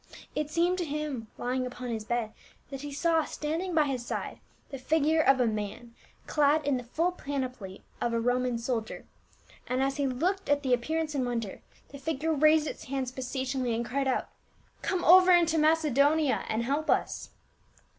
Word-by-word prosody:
It 300 Hz, 0 st, -2 dB
seemed 345 Hz, +3 st, +1 dB
to -, -, 0 dB
him, 295 Hz, -6 st, -4 dB
lying 255 Hz, +1 st, -1 dB
upon 250 Hz, 0 st, -7 dB
his 220 Hz, -2 st, -3 dB
bed, 230 Hz, -2 st, -2 dB, 0.4 s
that 270 Hz, -1 st, -6 dB
he 290 Hz, 0 st, -6 dB
saw 325 Hz, +2 st, +2 dB
standing 325 Hz, +5 st, -3 dB
by 310 Hz, -, +5 dB
his 265 Hz, -4 st, -2 dB
side -, -, -5 dB, 0.3 s
the 270 Hz, -, -6 dB
figure 315 Hz, +3 st, +2 dB
of 270 Hz, -3 st, +4 dB
a 250 Hz, -, +3 dB
man, 215 Hz, +2 st, -4 dB, 0.3 s
clad 300 Hz, 0 st, +2 dB
in 285 Hz, -2 st, +2 dB
the 250 Hz, -, -5 dB
full 330 Hz, +9 st, 0 dB
panoply 255 Hz, -, -5 dB, 0.2 s
of 240 Hz, -, 0 dB
a 230 Hz, -, 0 dB
Roman 245 Hz, +1 st, +1 dB
soldier, 230 Hz, -1 st, -3 dB, 0.6 s
and 255 Hz, +1 st, 0 dB
as 275 Hz, +1 st, -1 dB
he 285 Hz, -1 st, +1 dB
looked 355 Hz, +9 st, -1 dB
at 290 Hz, 0 st, +2 dB
the 260 Hz, -2 st, +2 dB
appearance 310 Hz, +6 st, -1 dB
in 280 Hz, -, 0 dB
Vv'onder, 235 Hz, -5 st, -3 dB, 0.3 s
the 280 Hz, -, -10 dB
figure 315 Hz, +2 st, -1 dB
raised 310 Hz, +1 st, +4 dB
its -, -, -6 dB
hands 265 Hz, -2 st, -3 dB
beseechingly 260 Hz, -1 st, -2 dB
and 235 Hz, +1 st, -2 dB
cried 270 Hz, +2 st, -1 dB
out, 260 Hz, -, 0 dB, 0.3 s
" -, -, -35 dB
Come 370 Hz, -2 st, -1 dB
over 370 Hz, +2 st, +8 dB
into 335 Hz, -2 st, +4 dB
Macedo 305 Hz, -2 st, +4 dB
nia 305 Hz, -4 st, 0 dB
and 220 Hz, +2 st, 0 dB
help 285 Hz, +6 st, -1 dB
us -, -, 0 dB
275 Hz, 185 wpm, -29 LUFS, 245-310 Hz, 0.6 s, over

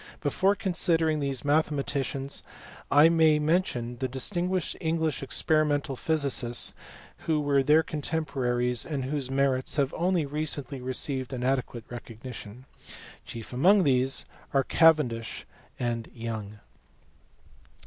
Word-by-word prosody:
Before 190 Hz, +7 st, +2 dB
considering 165 Hz, -4 st, +1 dB
these 140 Hz, -1 st, -3 dB
mathematicians 140 Hz, -2 st, 0 dB, 0.5 s
I 145 Hz, +2 st, +7 dB
may 160 Hz, -2 st, +4 dB
mention 150 Hz, -7 st, 0 dB
the 130 Hz, -, -1 dB
distinguished 175 Hz, +7 st, -2 dB
English 160 Hz, -2 st, 0 dB
experimental 145 Hz, 0 st, 0 dB
physic 140 Hz, -4 st, +1 dB
ists 120 Hz, 0 st, +2 dB, 0.5 s
who 160 Hz, -2 st, +2 dB
were 145 Hz, -2 st, +2 dB
their 150 Hz, +4 st, +4 dB
contemporaries, 130 Hz, -6 st, -1 dB
and 140 Hz, -5 st, -3 dB
whose 135 Hz, -1 st, -2 dB
merits 135 Hz, -1 st, +1 dB
have 140 Hz, -3 st, +1 dB
only 175 Hz, -2 st, +1 dB
recently 145 Hz, -2 st, -3 dB
received 130 Hz, +1 st, -2 dB
an 125 Hz, -1 st, -4 dB
adequate 125 Hz, -3 st, -1 dB
recognition. 120 Hz, 0 st, -9 dB, 0.6 s
Chief 115 Hz, +1 st, -8 dB
among 185 Hz, +10 st, +5 dB
these 130 Hz, -2 st, +2 dB, 0.3 s
are 135 Hz, -, +4 dB
Cavendish 145 Hz, -10 st, +2 dB, 0.3 s
and 120 Hz, -2 st, -2 dB
Young. 110 Hz, -3 st, -5 dB
140 Hz, 115 wpm, -27 LUFS, 125-155 Hz, 0.6 s, I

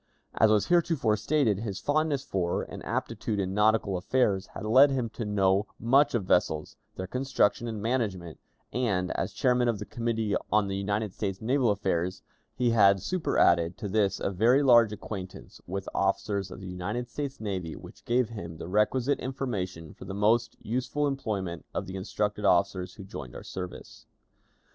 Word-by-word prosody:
As 110 Hz, -, +4 dB
was 105 Hz, -1 st, +3 dB
heretofore 165 Hz, -10 st, +2 dB
stated, 110 Hz, -2 st, +1 dB
his 105 Hz, -3 st, -4 dB
fondness 145 Hz, -2 st, 0 dB
for 90 Hz, -7 st, -1 dB
and -, -, -9 dB
aptitude 105 Hz, -2 st, -2 dB
in 95 Hz, -1 st, -1 dB
nautical 105 Hz, -2 st, +2 dB
affairs 100 Hz, -1 st, +1 dB
had -, -, -5 dB
led 130 Hz, +6 st, +7 dB
him 130 Hz, -4 st, -1 dB
to 115 Hz, -, -5 dB
know 100 Hz, 0 st, +2 dB
much 135 Hz, +4 st, +4 dB
of 105 Hz, -5 st, 0 dB
vessels, 80 Hz, -4 st, +1 dB, 0.2 s
their 95 Hz, -, -4 dB
construction 125 Hz, 0 st, 0 dB
and 110 Hz, -2 st, -4 dB
management, 100 Hz, -9 st, -2 dB, 0.3 s
and, 100 Hz, -7 st, 0 dB
as -, -, -2 dB
chairman 125 Hz, -3 st, +2 dB
of 115 Hz, -3 st, +1 dB
the 105 Hz, -, -6 dB
Committee 115 Hz, -3 st, -1 dB, 0.2 s
on 105 Hz, -1 st, +3 dB
United 100 Hz, +1 st, -2 dB
States 95 Hz, -2 st, -3 dB
Naval 125 Hz, +1 st, +2 dB
Affairs, 95 Hz, -3 st, -1 dB, 0.3 s
he 120 Hz, -1 st, +2 dB
had 100 Hz, -4 st, +5 dB
superadded 85 Hz, -, +2 dB
to 105 Hz, -, -4 dB
this 100 Hz, -1 st, +1 dB
a -, -, -1 dB
very 120 Hz, +9 st, +4 dB
large 120 Hz, -5 st, +6 dB
acquaintance 100 Hz, -3 st, -8 dB
with 95 Hz, +2 st, -4 dB
officers 100 Hz, 0 st, 0 dB
of 90 Hz, -, -9 dB
the 95 Hz, -, -7 dB
United 105 Hz, +7 st, -3 dB
States 140 Hz, +2 st, -5 dB
Navy, 95 Hz, -6 st, -4 dB
which -, -, -13 dB
gave 120 Hz, -1 st, +1 dB
him 85 Hz, -8 st, -7 dB
the 80 Hz, -, -7 dB
requisite 120 Hz, +8 st, +1 dB
information 95 Hz, -, -4 dB
for -, -, -12 dB
the 95 Hz, -, -6 dB
most 110 Hz, +3 st, +2 dB
useful 130 Hz, +5 st, -1 dB
employment 105 Hz, -11 st, -3 dB
of -, -, -2 dB
the 95 Hz, 0 st, -7 dB
instructed 105 Hz, +2 st, -2 dB
officers 90 Hz, -1 st, +2 dB
who 100 Hz, -, -9 dB
joined 75 Hz, -, -8 dB
our -, -, -8 dB
service. 90 Hz, -1 st, -8 dB
105 Hz, 170 wpm, -28 LUFS, 95-120 Hz, 0.3 s, led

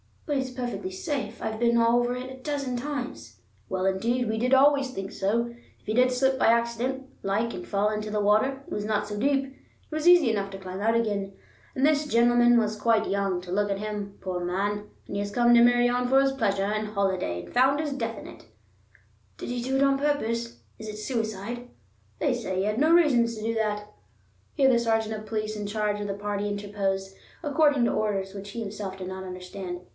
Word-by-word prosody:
"But 290 Hz, -3 st, 0 dB
it's 260 Hz, -1 st, -2 dB
perfectly 250 Hz, +9 st, -4 dB
safe. 285 Hz, -, -4 dB
I've 220 Hz, 0 st, -3 dB
been 235 Hz, 0 st, +3 dB
all 230 Hz, +1 st, +4 dB
over 245 Hz, 0 st, 0 dB
it 255 Hz, +1 st, -6 dB
a 260 Hz, 0 st, -11 dB
dozen 280 Hz, -3 st, -2 dB
times." 275 Hz, 0 st, -6 dB, 0.3 s
"Well, 185 Hz, 0 st, -2 dB
indeed, 230 Hz, +5 st, 0 dB
we 220 Hz, -, -1 dB
did 250 Hz, +3 st, +1 dB
always 275 Hz, 0 st, +5 dB
think 195 Hz, -4 st, -5 dB
so. 235 Hz, +5 st, -1 dB, 0.3 s
If -, -, -31 dB
you 215 Hz, -, 0 dB
did 250 Hz, +2 st, +4 dB
slip 260 Hz, +1 st, +1 dB
by -, -, +4 dB
accident, 235 Hz, +3 st, +1 dB, 0.2 s
like, 215 Hz, +4 st, -1 dB
and 180 Hz, -, -7 dB
fall 205 Hz, +1 st, +1 dB
into 215 Hz, 0 st, -3 dB
the 210 Hz, 0 st, 0 dB
water, 220 Hz, +7 st, +2 dB
it -, -, -8 dB
was 210 Hz, -, -2 dB
not 210 Hz, -1 st, 0 dB
so 205 Hz, 0 st, -4 dB
deep; 275 Hz, +3 st, +2 dB
it 270 Hz, 0 st, -14 dB, 0.4 s
was 310 Hz, +2 st, -1 dB
easy 345 Hz, -9 st, +7 dB
enough 200 Hz, -2 st, -1 dB
to 195 Hz, -, -6 dB
climb 185 Hz, 0 st, -7 dB
out 225 Hz, +3 st, +2 dB
again. 205 Hz, -4 st, -1 dB, 0.4 s
And 265 Hz, -, +2 dB
this 300 Hz, 0 st, +2 dB
gentleman 240 Hz, -1 st, +5 dB
was 215 Hz, -2 st, 0 dB
quite 225 Hz, -1 st, +2 dB
young, 195 Hz, -2 st, 0 dB
to 180 Hz, 0 st, -9 dB
look 205 Hz, +2 st, +1 dB
at 200 Hz, -, 0 dB
him, 205 Hz, -1 st, -5 dB
poor 180 Hz, -2 st, -3 dB
man; 205 Hz, +4 st, -2 dB, 0.2 s
and 200 Hz, -, -5 dB
he -, -, -1 dB
has 205 Hz, 0 st, -3 dB
come 240 Hz, +1 st, +4 dB
to 235 Hz, -, +7 dB
Meirion 245 Hz, +1 st, +4 dB
for 265 Hz, +2 st, +5 dB
his 275 Hz, 0 st, +2 dB
pleasure 200 Hz, -7 st, 0 dB
and 215 Hz, +1 st, -1 dB
holiday 190 Hz, -, -1 dB
and -, -, -13 dB
found 270 Hz, +4 st, +4 dB
his 300 Hz, -2 st, -3 dB
death 230 Hz, -4 st, -3 dB
in -, -, -9 dB
it!" -, -, -12 dB, 0.9 s
"Did -, -, -6 dB
he 245 Hz, 0 st, -2 dB
do 265 Hz, +2 st, -1 dB
it 270 Hz, -, +3 dB
on 275 Hz, 0 st, +3 dB
purpose? 235 Hz, -5 st, -1 dB, 0.2 s
Is 220 Hz, -, -7 dB
it 210 Hz, 0 st, -6 dB
suicide?" 225 Hz, +1 st, -3 dB, 0.5 s
"They 285 Hz, -4 st, +2 dB
say 220 Hz, -6 st, -3 dB
he -, -, +1 dB
had 210 Hz, +3 st, 0 dB
no 310 Hz, +3 st, +4 dB
reasons 250 Hz, -9 st, +4 dB
to 215 Hz, -, -7 dB
do 225 Hz, +1 st, 0 dB
that." 210 Hz, -1 st, -1 dB, 0.6 s
Here 270 Hz, -1 st, +4 dB
the 240 Hz, -, +4 dB
sergeant 225 Hz, -1 st, 0 dB
of 215 Hz, 0 st, -6 dB
police 215 Hz, 0 st, -3 dB
in 205 Hz, -1 st, -4 dB
charge 210 Hz, 0 st, -1 dB
of 205 Hz, -, -3 dB
the 200 Hz, -, -2 dB
party 205 Hz, 0 st, -3 dB
interposed, 200 Hz, -1 st, -2 dB, 0.3 s
according 290 Hz, -3 st, +3 dB
to -, -, +2 dB
orders, 195 Hz, -3 st, -1 dB
which 200 Hz, 0 st, -8 dB
he 235 Hz, -, -5 dB
himself 200 Hz, -2 st, -5 dB
did 185 Hz, -1 st, -6 dB
not 190 Hz, 0 st, -6 dB
understand. 180 Hz, 0 st, -7 dB
225 Hz, 220 wpm, -27 LUFS, 205-255 Hz, 0.9 s, easy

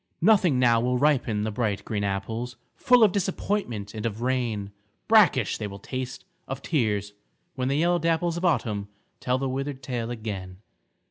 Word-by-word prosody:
Nothing 185 Hz, -7 st, +4 dB
now 120 Hz, -2 st, +4 dB
will 125 Hz, +1 st, +1 dB
ripen 125 Hz, -7 st, +2 dB
the 110 Hz, -, -1 dB
bright 105 Hz, -2 st, -2 dB
green 105 Hz, -2 st, -2 dB
apples, 110 Hz, +5 st, -3 dB, 0.2 s
Full 250 Hz, -2 st, +5 dB
of 210 Hz, -, +6 dB
disappointment 185 Hz, -, -2 dB
and 110 Hz, -1 st, -5 dB
of 115 Hz, 0 st, -3 dB
rain, 120 Hz, -6 st, -1 dB, 0.4 s
Brackish 190 Hz, -, +4 dB
they 105 Hz, -, -3 dB
will 100 Hz, -1 st, -8 dB
taste, 130 Hz, +5 st, -6 dB, 0.2 s
of 135 Hz, +1 st, -5 dB
tears, 105 Hz, -, 0 dB, 0.4 s
when 130 Hz, -1 st, -2 dB
the 140 Hz, +1 st, +1 dB
yellow 175 Hz, +2 st, +2 dB
dapples 165 Hz, +1 st, +1 dB
Of 170 Hz, -, -4 dB
Autumn 110 Hz, -, 0 dB, 0.3 s
tell 125 Hz, 0 st, 0 dB
the 135 Hz, +1 st, -2 dB
withered 135 Hz, 0 st, -4 dB
tale 120 Hz, -3 st, -3 dB
again. 100 Hz, -6 st, -5 dB
125 Hz, 165 wpm, -26 LUFS, 105-150 Hz, 0.4 s, of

